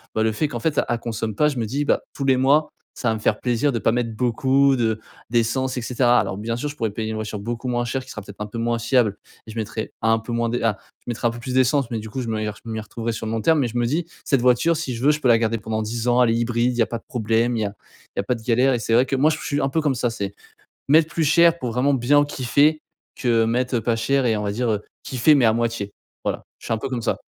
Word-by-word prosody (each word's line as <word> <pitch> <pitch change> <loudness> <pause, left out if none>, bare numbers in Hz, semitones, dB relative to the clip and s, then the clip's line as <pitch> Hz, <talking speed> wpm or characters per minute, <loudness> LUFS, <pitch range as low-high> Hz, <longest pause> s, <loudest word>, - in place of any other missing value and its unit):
bah, 110 - +2
le 110 - +2
fait, 130 +8 0
qu'en 120 -5 -5
fait 150 +4 -1
a - - +1
elle 120 - 0
consomme 115 -2 -4
pas. 150 - +3
Je 140 - -5
me 115 - -1
dis, 140 +7 -2
bah,: - - +2
«Tous 140 - -4
les 135 -1 +4
mois 140 +4 +3 0.3
ça 120 - -1
va 110 - +1
me - - -5
faire 105 0 +1
plaisir 125 +3 +1
de 120 - -1
pas 110 - +2
mettre 115 -1 -1
beaucoup 130 +4 +3
de 110 -3 0 0.3
d'essence» 125 +3 0
et - - -1
cetera. 120 +1 +3
Alors 95 - -2
bien 115 +3 -3
sûr, 145 +5 -3
je 145 - -8
pourrais 115 -7 -2
payer 110 +1 -4
une 110 - -3
voiture 110 -1 -4
beaucoup 120 +4 -4
moins 120 -1 0
chère, 130 +2 -2
qui - - -11
sera 105 - -6
peut-être 100 0 -13
un 105 - -3
peu 115 +3 -6
moins 120 0 0
fiable 115 -3 +2 0.3
et - - -8
je - - -11
mettrai 110 0 -4
un 115 0 +3
peu 110 +2 -8
moins 115 0 0
de 120 +1 -1
ah, 110 -3 +1 0.2
je - - -38
mettrai 120 0 -1
un - - 0
peu 120 - -8
plus 125 +1 -4
d'essence 130 0 +3
mais 115 - -1
du 110 +1 -8
coup 130 - -3
je 120 - -5
me 110 -1 -1
y 110 - -2
re 105 - -7
je 115 - -9
m'y 110 0 -3
retrouverais 115 +2 -4
sur 110 - -5
le - - -3
long 115 - -1
terme. 160 +5 +3
Mais 130 - +1
je 120 +1 -5
me 120 - +1
dis, 160 +7 -1 0.2
cette 135 -4 +2
voiture, 125 +7 +3
si 130 - -3
je 115 - -6
veux, - - +6
je 150 - -1
peux 130 - +2
la 115 -1 +6
garder 115 0 0
pendant 110 +1 -3
10 115 +2 -3
ans 120 +1 +4
elle 120 - +3
est - - +1
hybride, 120 +1 +1
il - - -6
y 115 - +5
a - - -3
pas 115 - -4
de - - -28
problème, 115 +1 0
il - - -1
y - - 0
a 100 - -4 0.4
il - - -2
y - - +3
a - - -8
pas 125 +5 0
de 115 - -10
galère 125 +3 +3
et - - -2
c'est 115 - -1
vrai 120 +3 +5
que 135 - 0
moi, 140 +4 +4
je 155 - -2
suis - - -10
je - - -4
suis 145 0 0
un 135 - +1
peu 160 +4 0
comme 145 -3 +1
ça. 120 0 0
C'est 100 -3 -5 0.5
mettre 155 +2 +5
plus 165 - 0
cher 170 +2 +5
pour 125 -7 -3
vraiment 130 +4 +2
bien 140 +3 +4
kiffer, 145 +3 +2 0.4
que 115 -2 +2
mettre, 125 +2 0
heu, - - +1
pas 115 +1 +1
cher 130 +3 +1
et 110 -2 +2
on 105 - -2
va 100 - -1
dire, 120 +2 -1
heu, 105 -1 -1 0.2
kiffer 130 +4 +3
mais 135 -5 +4
à 110 - +4
moitié, 115 -3 -2 0.3
voilà, - - -2
je - - -12
suis - - 0
un - - -2
peu - - -4
comme 125 -2 -2
ça. - - 0
120 Hz, 330 wpm, -22 LUFS, 115-130 Hz, 0.5 s, veux